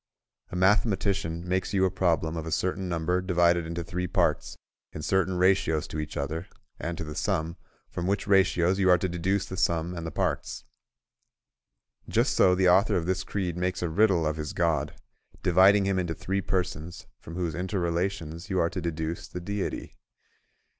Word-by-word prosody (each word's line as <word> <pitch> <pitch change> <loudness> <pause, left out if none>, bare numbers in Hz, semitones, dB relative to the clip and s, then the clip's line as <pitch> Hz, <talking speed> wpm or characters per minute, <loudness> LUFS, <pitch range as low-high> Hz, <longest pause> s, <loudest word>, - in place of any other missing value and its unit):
A - - -7
mathematician 95 -3 +1
makes 95 +2 -1
you 95 -1 +4
a 95 - +1
problem 85 -3 0
of 80 0 -4
a - - -4
certain 95 +2 -1
number 85 +2 0
divided 85 -2 +2
into 85 +1 -4
three 90 +2 -3
parts - - 0 0.4
in 75 - -6
certain 95 +1 +1
ratios 90 -4 +2
to 75 - -4
each 75 - -5
other 80 +4 -3 0.3
and 85 0 -4
to - - -4
the 75 -1 -6
sum, 85 -2 -1 0.3
from 90 - -4
which 100 +1 0
ratios 95 -2 +3
you 95 -1 +3
are 90 - +7
to 95 - -1
deduce 90 +3 -1
the 95 - -7
sum 85 +1 0
and 85 -1 -5
the - - -5
parts. - - -2 1.5
Just - - +2
so 90 -1 +5
the 95 0 +3
author 95 +4 +4
of 85 - 0
this 95 +1 -1
creed 90 -4 -3
makes 90 +1 -2
a 85 - 0
riddle 90 -1 +3
of 75 0 -1
his 75 -1 -4
God, 80 -4 0 0.5
dividing 95 +3 +5
him 95 -1 +1
into 85 -3 -2
three 100 +1 -2
persons, 90 -3 -3
from 80 - -10
whose 85 -3 -2
inter 95 +4 -3
relations 85 -1 -2
you 95 - 0
are 85 - +1
to 90 - -4
deduce 80 0 -3
the 90 - -6
Deity. 100 +2 -4
90 Hz, 185 wpm, -27 LUFS, 85-95 Hz, 1.5 s, are